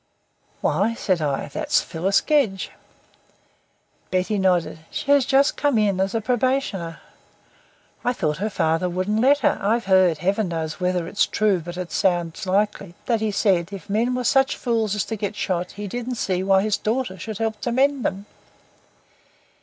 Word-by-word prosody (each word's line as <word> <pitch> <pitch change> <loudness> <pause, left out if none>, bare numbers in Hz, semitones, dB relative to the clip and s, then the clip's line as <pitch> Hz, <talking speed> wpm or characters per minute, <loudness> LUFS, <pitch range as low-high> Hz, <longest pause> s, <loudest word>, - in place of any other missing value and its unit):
"Why," 225 +3 +1
said 185 -6 0
I, 140 -3 -1
"there's 300 -1 +1
Phyllis 185 +4 0
Gedge." 275 -11 +1 1.4
Betty 185 +3 0
nodded. 180 -4 +1
"She 285 - -2
has 280 -3 +4
just 275 +1 +3
come 285 -5 +2
in 205 -3 +2
as 195 +3 0
a 225 - 0
probationer." 240 -7 -1 1.1
"I 245 - +2
thought 155 -11 -1
her 210 +5 -2
father 165 -2 0
wouldn't 185 +5 -1
let 280 +3 +4
her. - - +2
I've 225 +4 +1
heard 185 -4 +4
Heaven 195 +5 0
knows 160 -1 -4
whether 180 -2 0
it's 200 - +1
true, 205 -3 +1
but 175 +2 -8
it 180 -1 -5
sounds 175 -1 0
likely 200 -2 0
that 230 -3 0
he 220 - +1
said 195 -3 +1
if 195 0 -8
men 235 +4 +1
were 250 - -2
such 270 +2 +2
fools 225 -4 0
as 210 - -1
to 225 - -4
get 205 0 -4
shot 180 -3 -2
he 205 0 -6
didn't 245 +4 -4
see 185 -5 -1
why 190 0 +3
his 215 -1 +1
daughter 220 -4 -2
should 215 +3 -5
help 220 -1 -2
to 240 - -1
mend 270 +1 +2
them." 195 +2 -2
200 Hz, 175 wpm, -23 LUFS, 185-235 Hz, 1.4 s, has